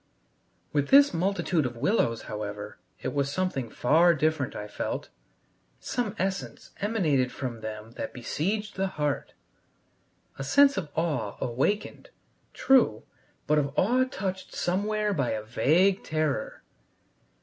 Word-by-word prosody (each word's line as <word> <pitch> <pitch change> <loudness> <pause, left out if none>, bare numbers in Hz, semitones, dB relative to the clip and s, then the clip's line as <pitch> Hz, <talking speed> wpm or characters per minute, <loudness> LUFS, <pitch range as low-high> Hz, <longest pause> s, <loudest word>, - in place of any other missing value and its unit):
With 145 -1 +1
this 280 +1 +7
multitude 175 -2 +1
of 125 -2 -3
willows, 120 - +1
however, 105 -1 -6 0.2
it - - -2
was 140 -1 0
something 145 -8 -2
far 165 +9 +4
different, 155 -3 0
I 105 - -5
felt. 105 - -4 0.7
Some 225 -4 -2
essence 190 -1 -3
emanated 160 - +1
from 120 -4 -5
them 110 0 -7
that - - -4
besieged 200 - -3
the 195 0 +1
heart. 145 -2 -1 1.1
A - - -2
sense 275 - +5
of 160 -6 -3
awe 150 -11 -1
awakened, 135 - -1 0.4
true, 250 - +3 0.4
but 150 0 +3
of 140 0 -3
awe 245 +7 +4
touched 190 -6 -5
somewhere 210 +3 0
by 135 -10 0
a 110 -1 -3
vague 175 - +2
terror. 155 -8 -2
155 Hz, 125 wpm, -27 LUFS, 125-195 Hz, 1.1 s, this